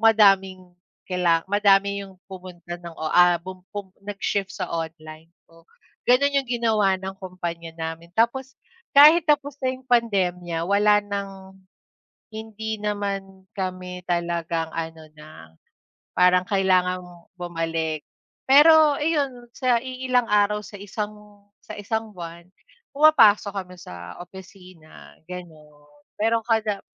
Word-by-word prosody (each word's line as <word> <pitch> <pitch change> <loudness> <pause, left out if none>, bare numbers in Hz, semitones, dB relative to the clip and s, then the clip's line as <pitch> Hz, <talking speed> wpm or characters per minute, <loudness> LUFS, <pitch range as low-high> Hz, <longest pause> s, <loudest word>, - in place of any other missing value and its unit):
madaming 195 -4 +4 0.5
kaila 175 -3 +2
madami 200 -1 +3
yung 190 - -16 0.2
pumunta 175 -2 -9
ng 170 -1 -10
o 155 0 -3
ah, 175 0 +5
bum 185 +1 -9
bum 200 -2 -6
nag-shift 200 -1 -3
sa - - -5
online, 160 -1 -6 0.2
oo. 165 0 -21 0.4
Ganun 280 +3 +4
yung 265 - -13
ginawa 220 -5 +2
ng 190 +1 -6
kumpanya 170 -3 -6
namin. 165 +1 -6
Tapos 260 +4 0 0.4
kahit 305 +4 +8
tapos 290 -1 +2
na 255 0 0
yung 260 0 -16
pandemya 180 -8 0
wala 205 +2 +4
nang 195 -1 -7 0.7
hindi 220 0 -5
naman 195 -2 -4
kami 185 -1 -5
talagang 170 -1 -1
ano 160 -1 -6
na, 155 0 -13 0.8
parang 180 0 +4
kailangan 185 -2 +2 0.4
bumalik. 165 -3 -3 0.4
Pero 300 +1 +7
iyon, 280 -6 -1
sa 255 -3 +2
iilang 255 -1 -1
araw 210 0 +2
sa 205 - -10
isang 210 0 -7 0.2
sa - - -10
isang 220 +1 -3
buwan 170 0 -9 0.5
pumapasok 220 -10 +5
kami 185 -2 -6
sa 90 - -10
opisina, 180 -2 -14
gano'n. 155 -5 -11 0.3
Pero 225 +2 +1
kada 220 -3 0
195 Hz, 120 wpm, -23 LUFS, 175-220 Hz, 0.8 s, kahit